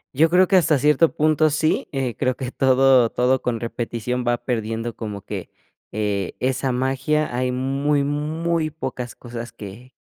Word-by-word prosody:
Yo 160 +3 +4
creo 180 +1 +4
que 190 - +4
hasta 160 -4 +3
cierto 150 +4 +3
punto 155 0 +3
sí, 155 +2 0
eh, 135 -4 -2
creo 130 -2 0
que 130 -2 -5
todo 130 -2 +4
todo 125 +1 +1
con 120 -2 -2
repetición 120 +1 -3
va 120 0 +2
perdiendo 115 -1 -3
como 105 -4 -6
que, - - -6 0.4
eh, 100 -2 -2
esa 130 0 0
magia, 130 +2 0
hay 125 0 0
muy 140 +3 0
muy 155 +3 -1
pocas 130 -5 -6
cosas 120 -1 -8
que 115 +5 -11
130 Hz, 160 wpm, -22 LUFS, 120-150 Hz, 0.4 s, Yo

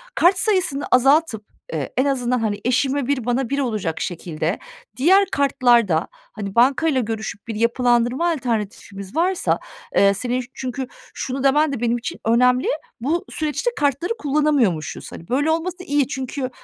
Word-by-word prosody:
kart 370 +2 +4
sayısını 365 -10 +1
azaltıp, 265 -3 +3 0.3
eee, - - -3
en 260 - +3
azından, 250 -3 0
hani, 210 -2 -1
eşime 260 +2 +1
1 270 -5 -1
bana 245 0 0
1 280 - -1
olacak 215 - -2
şekilde 170 +1 -3 0.4
diğer 380 +9 +5
kartlarda, 240 - +3
hani, 200 -2 -9
bankayla 265 +3 +3
görüşüp 220 -1 -5
bir 225 - -4
yapılandırma 240 +6 +2
alternatifimiz 210 - -4
varsa, 355 +3 +1 0.4
eee, 200 0 +5
senin 245 +5 -2
çünkü 260 0 -4 0.3
şunu 265 +1 -4
demen 295 +2 +3
de 255 - -3
benim 240 0 +1
için 240 +1 -6
önemli, 250 +3 +3 0.3
bu 315 +8 -1
süreçte 310 +10 -2
kartları 290 - 0
kullanamıyormuşuz. 280 - 0
Hani, 170 - -10
böyle 290 +5 +2
olması 355 +3 -2
iyi 285 -4 +1
çünkü 265 -1 -4
255 Hz, 145 wpm, -21 LUFS, 230-290 Hz, 0.4 s, diğer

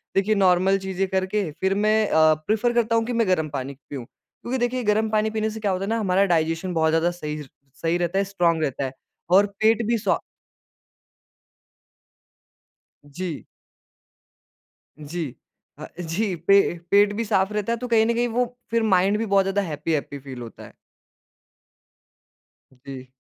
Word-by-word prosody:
देखिए 205 +2 +2
नॉर्मल 190 0 +3
चीज़ें 190 0 -2
करके 190 -1 -1
फिर 190 0 +2
मैं 215 +2 +2
अ, 155 0 +5
प्रेफर 225 +3 +1
करता 230 -1 +1
हूँ 225 0 +2
कि 245 - -3
मैं 230 -3 +1
गरम 160 -4 +1
पानी 140 -1 -5 0.2
पियूँ, 130 -5 -6
क्योंकि 245 - -8
देखिए, 245 +1 -1
गरम 215 +1 +1
पानी 215 0 +1
पीने 220 0 -1
से 220 - -7
क्या 205 -3 0
होता 185 +1 -2
है - - -4
ना 230 0 0
हमारा 195 -1 +2
डाइजेशन 165 0 0
बहुत 160 -1 +2
ज़्यादा 165 +2 +2
सही 150 -3 -6
र 140 - -10 0.4
सही 165 +2 +1
रहता 175 +2 -1
है - - +2
स्ट्राँग 175 -4 +1
रहता 135 -1 -2
है 130 - -5 0.4
और 190 +3 +6 0.2
पेट 225 +1 +3
भी 235 0 +2
सो - - 0 2.9
जी। 150 +2 -6 1.5
जी 160 +3 -4 0.5
अ, - - -8
जी, 180 +4 -2
पे 175 +1 +3
पेट 205 0 +5
भी 230 - -2
साफ 195 -2 +1
रहता 210 +2 -1
है 235 - -2
तो 250 - -5
कहीं 225 -2 +4
न 235 - +1
कहीं 240 +1 +1
वो 245 +2 0 0.3
फिर 230 -1 +2
माइंड 195 0 +3
भी 225 - -1
बहुत 200 -2 +3
ज़्यादा 195 +1 0
हैप्पी-हैप्पी 150 -4 -3
फील 130 -2 -9
होता 115 - -10
है। - - -14 2.1
जी। 130 -2 -8
195 Hz, 170 wpm, -23 LUFS, 165-220 Hz, 2.9 s, और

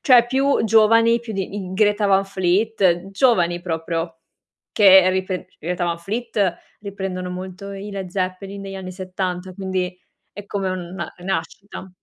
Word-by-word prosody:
cioè 245 -4 +6
più 270 +3 +2
giovani, 230 +2 +5
più 230 -2 -7
di 195 0 -4
i 190 -3 -5
Greta 205 +1 +2
Van 195 0 +3
Fleet, 190 -1 +1
giovani 180 -6 +2
proprio 165 -1 -3 0.5
che 190 -3 +7
ripre 185 0 -1
i - - -31
Greta 175 +2 -2
Van 170 -1 -1
Fleet 205 0 -1 0.2
riprendono 190 -3 -5
molto 185 +2 -7
i 200 +1 -7
Led 195 -2 -5
Zeppelin 190 +1 -3
negli 195 0 -7
anni 190 -1 -6
'70, 185 0 -4
quindi 185 -1 -3 0.4
è 205 0 -9
come 195 -1 -2
una 180 -1 -5
rinascita. 190 +1 -5
190 Hz, 150 wpm, -21 LUFS, 180-205 Hz, 0.5 s, che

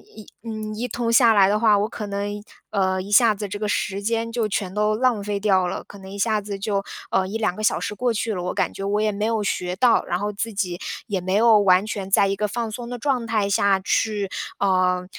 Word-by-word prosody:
一 215 -1 -11 0.2
嗯， 215 -2 -5
一 235 +3 -3
通 235 0 -2
下 230 -1 +6
来 195 -2 +5
的 210 +1 +1
话， 215 -2 +4
我 205 +2 0
可 215 -2 -6
能 200 0 -3
一 210 - -7 0.3
呃， 190 -2 +1
一 200 - -9
下 220 0 +5
子 205 0 -5
这 205 +2 -5
个 210 - -2
时 200 -1 -1
间 230 +2 -1
就 230 -2 0
全 195 -2 -3
都 210 +1 +1
浪 240 -2 +1
费 205 0 -2
掉 190 -3 +2
了， - - -4
可 200 - -13
能 190 -1 -11
一 200 - -8
下 215 +1 +1
子 200 -1 -6
就， 195 0 -1 0.3
呃， 190 - +1
1、2 215 -1 -1
个 - - -7
小 - - +2
时 - - -3
过 240 +3 0
去 220 0 -2
了， 180 - -3
我 180 - -3
感 - - -1
觉 195 - -7
我 205 +1 0
也 215 - +1
没 210 +1 -2
有 225 -1 0
学 180 -3 -2
到。 235 +5 +3
然 175 - -1
后 205 +2 -2
自 215 +2 -4
己 180 -3 -2 0.3
也 200 -4 -1
没 185 +2 -2
有 220 0 +6
完 190 -1 +4
全 200 -3 -5
在 200 0 +4
一 195 - 0
个 210 +1 -1
放 230 +2 -3
松 235 +2 -6
的 245 - -5
状 250 -2 -1
态 215 -3 0
下 200 -1 +3
去， 205 0 0 0.3
呃， 185 -2 +2
205 Hz, 275 characters per minute, -23 LUFS, 195-220 Hz, 0.3 s, 下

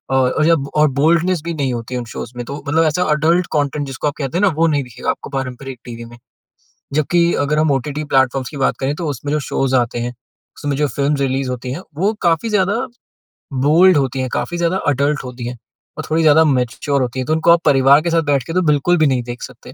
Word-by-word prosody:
और 130 -1 +3
और 155 - +1
जब 160 -4 +2
और 150 -1 +4
बोल्डनेस 165 +4 +2
भी 170 - -2
नहीं 135 -4 -1
होती 120 +2 -5
उन 120 - -4
शोज़ - - -6
में 120 - -3
तो 140 - -6
मतलब 160 +3 +3
ऐसा 155 +4 +1
एडल्ट 165 +4 +2
कंटेंट 145 0 0
जिसको 135 +2 -3
आप 145 - -1
कहते 140 +3 -3
हैं - - 0
ना - - +4
वो 165 - +3
नहीं 145 -3 +1
दिखेगा 125 -2 -6
आपको - - -8
पारंपरिक 130 -1 -5
टीवी 115 -1 -8
में। 120 0 -13 0.8
जबकि 170 +3 +2
अगर 150 +2 0
हम 155 -2 +2
ओटीटी 145 +3 -2
प्लेटफ़ॉर्म्स 130 -2 +1
की 145 - -8
बात 135 - +1
करें 135 +2 -1
तो 165 -1 -4
उसमें 145 +2 -4
जो 150 - +1
शोज़ 130 -1 0
आते 120 -1 0
हैं, 120 +1 -3 0.4
उसमें 145 -1 -2
जो 150 -1 +1
फ़िल्म्स 140 +2 -1
रिलीज़ 135 -1 -1
होती 125 0 -5
हैं 175 - -6 0.2
वो 200 +5 +1
काफ़ी 170 +6 +1
ज़्यादा 200 0 +1 0.9
बोल्ड 175 +2 +6
होती 135 -1 -1
हैं। 130 - -2
काफ़ी 175 - -2
ज़्यादा 170 +2 0
एडल्ट 145 +2 0
होती 125 -1 -6
हैं। 125 -1 -6 0.4
और - - -4
थोड़ी 160 +1 +2
ज़्यादा 160 +1 +6
मैच्योर 135 +1 0
होती 125 +1 -2
हैं। 130 - -2
तो 155 - +1
उनको 160 +1 +3
आप 170 0 +5
परिवार 140 +1 +5
के 170 - -2
साथ 165 0 +3
बैठ 140 -3 +1
के 165 - -4
तो 185 - +2
बिल्कुल 150 +3 +2
भी 155 -2 +3
नहीं 125 -3 0
देख 120 0 -7
सकते। - - -11
145 Hz, 240 wpm, -18 LUFS, 130-160 Hz, 0.9 s, बोल्ड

